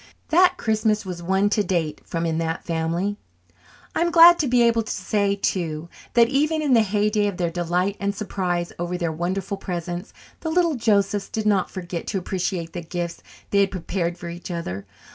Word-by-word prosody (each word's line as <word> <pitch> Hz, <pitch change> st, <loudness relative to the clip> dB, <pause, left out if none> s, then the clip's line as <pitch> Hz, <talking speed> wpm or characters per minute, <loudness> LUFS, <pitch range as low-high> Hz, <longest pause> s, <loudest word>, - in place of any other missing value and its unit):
That 360 Hz, +3 st, +5 dB
Christmas 215 Hz, -2 st, +1 dB
was 180 Hz, -2 st, -5 dB
one 190 Hz, +3 st, +2 dB
to 210 Hz, -, +2 dB
date 170 Hz, -5 st, -1 dB
from 165 Hz, 0 st, -3 dB
in 165 Hz, -1 st, 0 dB
that 165 Hz, 0 st, -2 dB
family. 170 Hz, +5 st, -1 dB, 0.8 s
I'm 340 Hz, +1 st, +1 dB
glad 340 Hz, +1 st, +8 dB
to 295 Hz, -, +1 dB
be 245 Hz, -1 st, +4 dB
able 230 Hz, -1 st, +3 dB
to 220 Hz, -, -5 dB
say, 200 Hz, +1 st, 0 dB
too, 170 Hz, -5 st, -2 dB, 0.3 s
that 235 Hz, -1 st, +6 dB
even 305 Hz, +4 st, +1 dB
in 280 Hz, -3 st, +2 dB
the 230 Hz, -, +6 dB
heyday 210 Hz, 0 st, +1 dB
of 200 Hz, -3 st, -3 dB
their 170 Hz, -2 st, 0 dB
delight 180 Hz, +3 st, 0 dB
and 200 Hz, 0 st, -1 dB
surprise 180 Hz, -4 st, -2 dB
over 175 Hz, +1 st, -2 dB
their 170 Hz, -2 st, -1 dB
wonderful 185 Hz, +5 st, -2 dB
presents, 175 Hz, 0 st, -5 dB, 0.3 s
the 320 Hz, -, -3 dB
little 340 Hz, 0 st, +2 dB
Josephs 205 Hz, -5 st, +1 dB
did 220 Hz, -1 st, -3 dB
not 200 Hz, -3 st, +2 dB
forget 175 Hz, -2 st, -6 dB
to -, -, -1 dB
appreciate 180 Hz, -2 st, -3 dB
the 175 Hz, -, -4 dB
gifts 170 Hz, 0 st, -4 dB, 0.3 s
they 200 Hz, -, +3 dB
had 200 Hz, -1 st, +4 dB
prepared 175 Hz, -1 st, -3 dB
for 170 Hz, -, -8 dB
each 170 Hz, +2 st, -7 dB
other. 100 Hz, -, -5 dB
190 Hz, 190 wpm, -23 LUFS, 175-215 Hz, 0.8 s, glad